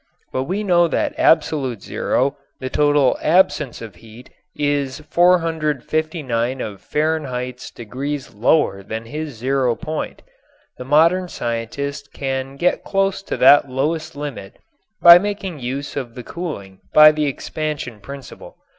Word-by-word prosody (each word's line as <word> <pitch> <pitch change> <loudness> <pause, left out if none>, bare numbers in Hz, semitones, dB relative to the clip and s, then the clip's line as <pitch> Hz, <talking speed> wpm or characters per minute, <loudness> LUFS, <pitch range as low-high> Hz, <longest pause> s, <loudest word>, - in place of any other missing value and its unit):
But 130 - -1
we 195 +8 -2
know 175 -3 +4
that - - -1
absolute 135 - +2
zero, 135 +2 0 0.2
the 130 0 -5
total 145 -3 +3
absence 155 -7 +2
of 105 -6 -10
heat, 115 +6 -15 0.2
is 145 -2 -1
459 155 -6 +1
of 100 -5 -6
Fahrenheit's 135 -5 -2
degrees 135 +5 -6
lower 110 -2 +2
than 110 +3 -6
his 150 +2 -6
zero 130 0 +1
point. 155 +2 -5 0.6
The 125 - -6
modern 165 +6 +3
scientist 140 +3 -4
can 135 0 -3
get 175 +6 0
close 195 -1 0
to - - -4
that 140 +1 +6
lowest 155 +5 -2
limit 145 -9 -7 0.5
by 170 0 +11
making 200 -4 -4
use 135 +3 -5
of 125 -5 -5
the 125 - -7
cooling 100 - -7 0.2
by 155 0 +9
the 150 -1 -1
expansion 145 -4 -4
principle. 140 +4 -11
140 Hz, 130 wpm, -20 LUFS, 125-155 Hz, 0.6 s, by